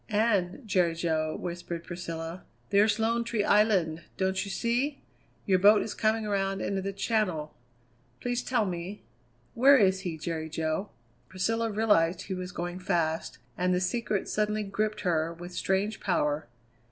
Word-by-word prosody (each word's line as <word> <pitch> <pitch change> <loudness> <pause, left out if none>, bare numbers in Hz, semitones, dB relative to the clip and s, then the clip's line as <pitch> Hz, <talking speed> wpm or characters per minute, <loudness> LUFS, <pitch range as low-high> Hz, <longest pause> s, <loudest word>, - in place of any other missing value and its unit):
"And, 210 +1 +1
Jerry 180 -4 +2
Jo," 160 -2 -1
whispered 175 -1 -5
Priscilla, 170 0 -6 0.3
"there's 205 +1 +4
Lone 230 +1 +1
Tree 230 -3 -1
Island, 195 -7 +3 0.2
don't 190 0 0
you 200 - -6
see? 245 +8 -1 0.4
Your 190 -2 +3
boat 205 +2 +6
is 220 - -5
coming 220 0 +1
around 195 -1 0
into 195 0 -1
the 195 +1 -3
Channel. 195 -7 -1 0.7
Please 245 0 -1
tell 240 -4 +1
me 180 +2 -5 0.5
where 275 +4 +7
he 215 - +6 0.3
is, 160 -1 -9
Jerry 160 -2 -3
Jo 160 +5 -2 0.2
" 120 +1 -37
Priscilla 225 +5 0
realized 205 -5 +2
he 195 - -4
was 180 0 -5
going 175 +1 -4
fast, 170 -4 -1 0.2
and 180 0 +1
the - - +2
secret 205 +2 -1
suddenly 210 0 0
gripped 210 +2 -2
her 165 -3 +1
with 175 +1 -9
strange 195 +4 0
power. 150 -6 0
190 Hz, 155 wpm, -29 LUFS, 170-215 Hz, 0.7 s, where